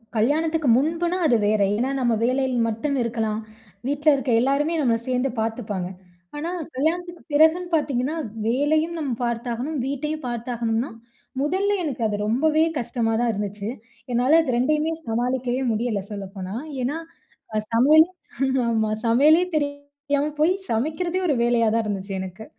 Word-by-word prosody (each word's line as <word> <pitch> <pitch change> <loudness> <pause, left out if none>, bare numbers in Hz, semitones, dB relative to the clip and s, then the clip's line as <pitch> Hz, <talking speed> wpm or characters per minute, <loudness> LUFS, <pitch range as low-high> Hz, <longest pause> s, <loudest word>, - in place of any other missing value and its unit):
கல்யாணத்துக்கு 305 +6 +1
முன்புனா 335 +5 0
அது 245 -6 +4
வேற. 215 0 +2
ஏன்னா 250 +5 0
நம்ம 240 -2 +2
வேலையில 260 +1 +1
மட்டும் 250 +6 -1
இருக்கலாம். 225 -2 -1 0.5
வீட்ல 290 +2 +2
இருக்க 270 -2 -1
எல்லாருமே 285 +5 +1
நம்மள 235 -4 +2
சேந்து 255 +1 +1
பாத்துப்பாங்க. 215 -5 -2 0.5
ஆனா 320 +4 -3 0.3
கல்யாணத்துக்கு 345 +5 -1
பிறகுன்னு 320 +4 +4
பாத்தீங்கன்னா, 280 -1 0 0.3
வேலையும் 310 +7 +1
நம்ம 280 -4 -2
பார்த்தாகணும் 240 +5 -2
வீட்டையும் 290 +1 -3
பார்த்தாகணும்னா, 235 0 -2 0.5
முதல்ல 380 +7 +1
எனக்கு 275 -6 -3
அது 210 - -2
ரொம்பவே 310 +7 +3 0.2
கஷ்டமா 230 -2 -1
தான் 240 -1 +2
இருந்துச்சு. 205 0 -4 0.4
என்னால 255 +6 +4
அது 260 -6 -1
2யுமே 305 +5 +1 0.2
சமாளிக்கவே 245 +2 -1
முடியல 220 -1 -1
சொல்லப்போனா, 195 -1 -6 0.3
ஏன்னா 290 +6 -1 0.6
அ - - +3
சமையல் 300 +7 +7 0.6
ஆமா, 220 -2 +1 0.2
சமையலே 295 +9 +5
தெரியாம 285 0 -2
போய் 325 +4 +4 0.2
சமைக்கிறதே 315 +10 -1
ஒரு 290 - +2
வேலையா 235 -1 +3
தான் 230 0 +2
இருந்துச்சு 195 -1 -4
எனக்கு. 190 +4 -8
260 Hz, 135 wpm, -23 LUFS, 230-305 Hz, 0.6 s, சமையல்